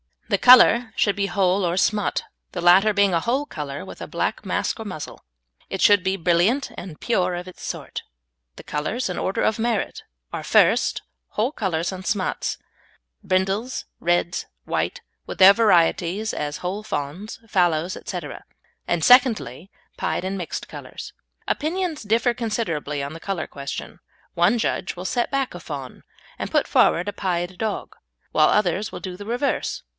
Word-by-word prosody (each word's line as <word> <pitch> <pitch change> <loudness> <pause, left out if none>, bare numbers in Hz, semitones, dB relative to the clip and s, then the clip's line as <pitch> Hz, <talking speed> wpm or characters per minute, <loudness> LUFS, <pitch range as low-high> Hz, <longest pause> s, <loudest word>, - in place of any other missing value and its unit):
The - - +3
colour 245 -2 +7
should 205 -1 +1
be 200 - +1
whole 195 -1 +1
or 175 0 0
smut, 205 +2 +1 0.3
the 175 - -3
latter 190 +5 +6
being 200 -2 +3
a 170 - +3
whole 255 - 0
colour 145 - -6
with - - -10
a - - -5
black - - -2
mask - - -1
or - - -6
muzzle. - - -7 0.4
It 190 - -4
should 205 -3 +6
be 190 +1 +1
brilliant 190 +10 +2
and 175 -4 -8
pure 185 -6 +1
of 180 +1 -6
its 185 - -13
sort. - - -5 0.5
The - - -11
colours 190 +11 -2
in 180 - -3
order 190 - -1
of 220 - +1
merit 230 -2 -1 0.3
are, - - -4
first, - - +3 0.3
whole 230 +6 0
colours 180 - -1
and 185 0 -8
smuts, 205 -3 -1
viz., - - -39 0.6
brindles, 195 +7 -1
reds, 175 0 0 0.2
white, - - -2 0.3
with - - -6
their 190 +1 +9
varieties, 200 -1 +2
as 150 0 -3
whole 185 +4 -3
fawns, 180 +1 -5
fallows, 175 -3 +1
etc., 175 -6 -6 0.4
and, 165 - 0
secondly, 225 - +4 0.3
pied - - -1
and 190 +1 -3
mixed 175 -3 -5
colours. - - -9 0.4
Opinions 330 0 -1
differ 225 +3 +2
considerably 180 - -2
on 140 - -5
the 165 - -8
colour 195 -1 -3
question; 140 -1 -7 0.3
one 175 +7 +3
judge 220 - -1
will 180 +1 -7
set 240 +5 0
back 275 -2 -1
a 175 - -7
fawn 140 -6 -8 0.4
and - - -3
put - - +1
forward 175 +4 +3
a - - -5
pied 180 -1 -2
dog, 220 +1 -3 0.4
whilst - - +4
others 210 +1 +1
will - - -6
do 185 -2 -6
the 205 - -9
reverse. 245 +6 -1
190 Hz, 170 wpm, -23 LUFS, 175-220 Hz, 0.6 s, their